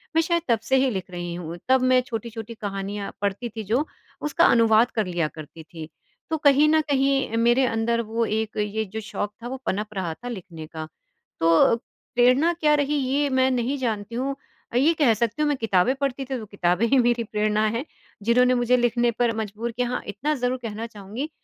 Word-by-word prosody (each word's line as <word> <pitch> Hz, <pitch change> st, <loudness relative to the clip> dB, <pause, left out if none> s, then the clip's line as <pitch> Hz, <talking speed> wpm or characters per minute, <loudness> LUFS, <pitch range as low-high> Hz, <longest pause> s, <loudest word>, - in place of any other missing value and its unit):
मैं 325 Hz, -, +5 dB
शायद 340 Hz, +1 st, +1 dB
तब 230 Hz, -2 st, +3 dB
से 265 Hz, -, +4 dB
ही 265 Hz, 0 st, +3 dB
लिख 190 Hz, -2 st, -4 dB
रही 175 Hz, -1 st, -5 dB
हूँ। 170 Hz, -1 st, -6 dB
तब 260 Hz, -1 st, +5 dB
मैं 255 Hz, 0 st, +4 dB
छोटी-छोटी 225 Hz, -1 st, -6 dB
कहानियाँ 200 Hz, -1 st, -5 dB
पढ़ती 200 Hz, +4 st, -2 dB
थी 220 Hz, 0 st, -6 dB
जो 235 Hz, +9 st, 0 dB, 0.4 s
उसका 300 Hz, +3 st, +2 dB
अनुवाद 230 Hz, 0 st, +4 dB
कर 220 Hz, -3 st, 0 dB
लिया 175 Hz, -3 st, -1 dB
करती 155 Hz, +1 st, -11 dB
थी, 160 Hz, -1 st, -10 dB, 0.4 s
तो 320 Hz, -, 0 dB
कहीं 290 Hz, 0 st, +5 dB
न 315 Hz, 0 st, +4 dB
कहीं 270 Hz, -4 st, +1 dB
मेरे 240 Hz, +3 st, +4 dB
अंदर 235 Hz, 0 st, 0 dB
वो 230 Hz, +1 st, -1 dB
एक 220 Hz, 0 st, -2 dB
ये 210 Hz, +1 st, -1 dB
जो 215 Hz, +2 st, -6 dB
शौक 205 Hz, -1 st, -4 dB
था -, -, -4 dB
वो 265 Hz, +2 st, -4 dB
पनप 210 Hz, +2 st, -2 dB
रहा 185 Hz, -4 st, -3 dB
था 245 Hz, +9 st, -10 dB
लिखने 175 Hz, -8 st, -8 dB
का। 155 Hz, 0 st, -7 dB, 0.5 s
तो, 165 Hz, +7 st, +5 dB, 0.4 s
प्रेरणा 255 Hz, +7 st, +4 dB
क्या 305 Hz, -3 st, +2 dB
रही 290 Hz, 0 st, 0 dB
ये 280 Hz, +2 st, +1 dB
मैं 260 Hz, 0 st, +3 dB
नहीं 255 Hz, +3 st, 0 dB
जानती 225 Hz, -3 st, -3 dB
हूँ 270 Hz, +3 st, -2 dB, 0.4 s
अ, -, -, +2 dB
ये 310 Hz, +6 st, +4 dB
कह 285 Hz, -8 st, +3 dB
सकती 230 Hz, +5 st, -1 dB
हूँ 300 Hz, -, +3 dB
मैं 290 Hz, -, +1 dB
किताबें 220 Hz, +1 st, +2 dB
पढ़ती 275 Hz, -1 st, -2 dB
थी, 265 Hz, 0 st, -3 dB
तो 220 Hz, -, -7 dB
किताबें 185 Hz, 0 st, 0 dB
ही 270 Hz, -, +3 dB
मेरी 240 Hz, -1 st, +2 dB
प्रेरणा 215 Hz, 0 st, 0 dB
हैं, 230 Hz, +6 st, -2 dB, 0.4 s
जिन्होंने 250 Hz, +3 st, +4 dB
मुझे 245 Hz, 0 st, +3 dB
लिखने 240 Hz, 0 st, +2 dB
पर 235 Hz, 0 st, 0 dB
मजबूर 220 Hz, +2 st, -4 dB
किया 245 Hz, +1 st, -1 dB
हाँ, 250 Hz, -, -2 dB
इतना 230 Hz, +10 st, -2 dB
ज़रूर 250 Hz, -1 st, -1 dB
कहना 225 Hz, +1 st, -4 dB
चाहूँगी। 220 Hz, +6 st, -6 dB
230 Hz, 205 wpm, -24 LUFS, 210-260 Hz, 0.5 s, मैं